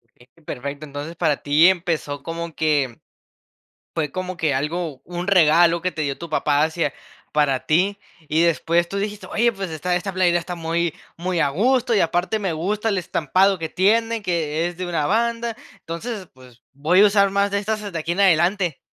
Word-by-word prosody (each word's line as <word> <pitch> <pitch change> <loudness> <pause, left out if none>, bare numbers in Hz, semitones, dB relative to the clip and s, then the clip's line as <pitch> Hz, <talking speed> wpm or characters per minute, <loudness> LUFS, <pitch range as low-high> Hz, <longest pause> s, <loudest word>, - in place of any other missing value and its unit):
Bien, 120 +1 -22 0.2
perfecto, 140 +3 -6
entonces 145 +3 -7
para 150 -3 +1
ti 150 +4 +4
empezó 165 -6 0
como 165 0 -5
que 145 -6 0 1.0
fue 155 -3 -1
como 185 -1 -4
que 155 -4 0
algo, 150 0 -3
un 175 0 -5
regalo 170 -2 +4
que 185 - 0
te 155 - -3
dio 140 -2 -2
tu 170 -2 -8
papá 150 -1 +2
hacia 160 -2 0 0.4
para 145 -3 +1
ti, 190 +6 +2 0.3
y 160 +2 +2
después 170 0 +2
tú 200 - -5
dijiste: 205 +1 -4
"Oye, 235 +1 +1
pues 195 -3 -5
esta 160 +3 -2
esta 195 +2 -3
playera 175 -2 +3
está 175 +1 -5
muy 170 0 -1 0.2
muy 175 0 -2
a - - +3
gusto, 240 - +2
y 205 - +3
aparte 175 +6 0
me 195 -5 -2
gusta 205 +7 -1
el 200 - 0
estampado 185 +3 +1
que 160 -1 -4
tiene, 225 +5 +1
que 165 -3 -1
es 175 -1 -5
de 185 +1 -4
una 165 -4 -1
banda, 230 +1 0 0.2
entonces, 195 +4 -6
pues 125 -2 -18
voy 150 +7 +3
a 210 - +8
usar 200 -1 +3
más 200 +1 +1
de 200 - 0
estas 210 0 -3
de 170 - -3
aquí 165 +2 -2
en 190 - -1
adelante". 180 -2 +3
170 Hz, 195 wpm, -22 LUFS, 155-195 Hz, 1.0 s, a